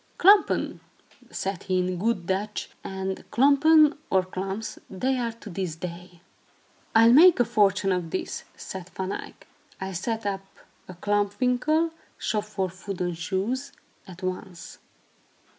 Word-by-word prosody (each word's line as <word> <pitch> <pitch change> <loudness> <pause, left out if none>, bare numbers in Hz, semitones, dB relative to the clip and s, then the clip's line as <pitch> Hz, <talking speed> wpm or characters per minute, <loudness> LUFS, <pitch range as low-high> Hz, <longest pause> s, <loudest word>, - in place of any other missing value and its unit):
"Klompen," 400 +2 +4 0.5
said 195 -2 -3
he, 185 -1 -1
in 180 -1 -1
good 205 -3 0
Dutch, 200 +3 -2
and 190 0 -4
klompen, 295 +4 +5
or 190 -1 +3
klomps, 190 +3 -5
they 255 +8 0
are 235 -2 -2
to 225 -2 -11
this 175 -3 -3
day. 175 +1 -8 0.7
"I'll 230 +1 +7
make 340 +4 +8
a 245 - +5
fortune 200 -3 +2
out 185 - +2
of 165 -2 -8
this," 185 - -4
said 190 -1 -8
Van 190 0 -3
Eyck. - - -7 0.3
"I'll 190 0 -4
set 225 +5 -3
up 195 -1 -2 0.4
a 185 - -9
klomp 205 +2 0
winkel 305 +6 +2 0.3
(shop 210 -1 -1
for 195 -4 -3 0.2
wooden 180 -3 -2
shoes) 205 +11 -2 0.3
at 185 0 -11
once." 185 -1 -6
195 Hz, 140 wpm, -26 LUFS, 185-235 Hz, 0.7 s, make